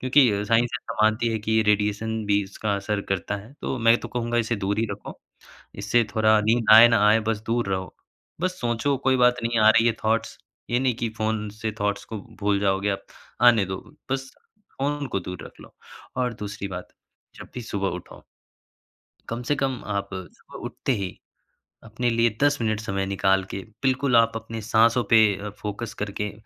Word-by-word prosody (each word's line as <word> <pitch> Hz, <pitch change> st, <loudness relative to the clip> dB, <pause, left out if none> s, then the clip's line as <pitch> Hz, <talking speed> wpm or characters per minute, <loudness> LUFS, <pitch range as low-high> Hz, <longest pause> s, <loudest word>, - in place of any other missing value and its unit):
क्योंकि 130 Hz, -1 st, +5 dB
अ, 100 Hz, 0 st, -1 dB
साइंस 115 Hz, +3 st, +3 dB
ऐसा -, -, -7 dB
मानती 110 Hz, +2 st, +3 dB
है 110 Hz, -, -1 dB
कि 110 Hz, +1 st, -3 dB
ये 110 Hz, 0 st, +4 dB
रेडिएशन 105 Hz, +1 st, 0 dB
भी 100 Hz, 0 st, +2 dB
इसका 100 Hz, +1 st, -3 dB
असर 100 Hz, +1 st, -2 dB
करता 100 Hz, +2 st, -1 dB
है। 105 Hz, +6 st, -12 dB
तो -, -, -2 dB
मैं 115 Hz, 0 st, +5 dB
तो -, -, -7 dB
कहूँगा 120 Hz, 0 st, -1 dB
इसे 115 Hz, 0 st, 0 dB
दूर 100 Hz, +1 st, -2 dB
ही 115 Hz, -, +1 dB
रखो। 100 Hz, +1 st, -8 dB, 0.6 s
इससे 105 Hz, +4 st, +2 dB
थोड़ा 110 Hz, 0 st, +4 dB
नींद 115 Hz, +2 st, +1 dB
आए 115 Hz, +2 st, +10 dB
ना 115 Hz, -3 st, +3 dB
आए, 110 Hz, +2 st, +5 dB
बस 110 Hz, -1 st, -2 dB
दूर 115 Hz, -3 st, 0 dB
रहो। 95 Hz, -1 st, -3 dB, 0.5 s
बस 185 Hz, +1 st, -1 dB
सोचो 120 Hz, +4 st, 0 dB
कोई 130 Hz, 0 st, +4 dB
बात 125 Hz, 0 st, +5 dB
नहीं 115 Hz, -1 st, +1 dB
आ 110 Hz, -, +7 dB
रही 115 Hz, +1 st, +5 dB
है 115 Hz, -, +3 dB
थॉट्स 110 Hz, +1 st, 0 dB, 0.3 s
ये 120 Hz, -, +2 dB
नहीं 130 Hz, -2 st, +1 dB
की 120 Hz, 0 st, -2 dB
फ़ोन 110 Hz, -1 st, -1 dB
से 110 Hz, -, -1 dB
थॉट्स 100 Hz, 0 st, -1 dB
को 110 Hz, -, -6 dB, 0.2 s
भूल 100 Hz, 0 st, +2 dB
जाओगे 100 Hz, 0 st, +1 dB
आप, 100 Hz, -1 st, -3 dB, 0.4 s
आने 120 Hz, -4 st, +6 dB
दो। 95 Hz, 0 st, -4 dB, 0.3 s
बस 135 Hz, 0 st, -2 dB, 0.5 s
फ़ोन-ओन 145 Hz, +1 st, -1 dB
को 100 Hz, -, -2 dB
दूर 90 Hz, 0 st, -7 dB
रख -, -, -14 dB
लो। -, -, -15 dB, 0.4 s
और 125 Hz, -2 st, 0 dB
दूसरी 100 Hz, -1 st, -5 dB
बात, 90 Hz, -2 st, -7 dB, 0.5 s
जब -, -, -11 dB
भी 125 Hz, -, -4 dB
सुबह 100 Hz, -3 st, -2 dB
उठो 90 Hz, -, -11 dB, 1.1 s
कम 115 Hz, +1 st, -3 dB
से 145 Hz, -, +3 dB
कम 135 Hz, -3 st, -2 dB
आप 100 Hz, -, -2 dB
सुबह 95 Hz, -2 st, -10 dB
उठते -, -, -3 dB
ही 95 Hz, -3 st, -5 dB, 0.7 s
अपने 120 Hz, +2 st, -1 dB
लिए 115 Hz, 0 st, +3 dB
10 145 Hz, 0 st, +3 dB
मिनट 110 Hz, -2 st, 0 dB
समय 95 Hz, -3 st, -2 dB
निकाल 95 Hz, 0 st, +2 dB
के -, -, -4 dB, 0.2 s
बिल्कुल 130 Hz, -1 st, +2 dB
आप 115 Hz, 0 st, +5 dB
अपनी 115 Hz, 0 st, -6 dB
साँसों 115 Hz, +2 st, +3 dB
पे 115 Hz, -, +7 dB, 0.4 s
फोकस 105 Hz, +1 st, -5 dB
करके 105 Hz, -1 st, -4 dB
110 Hz, 195 wpm, -24 LUFS, 100-120 Hz, 1.1 s, आए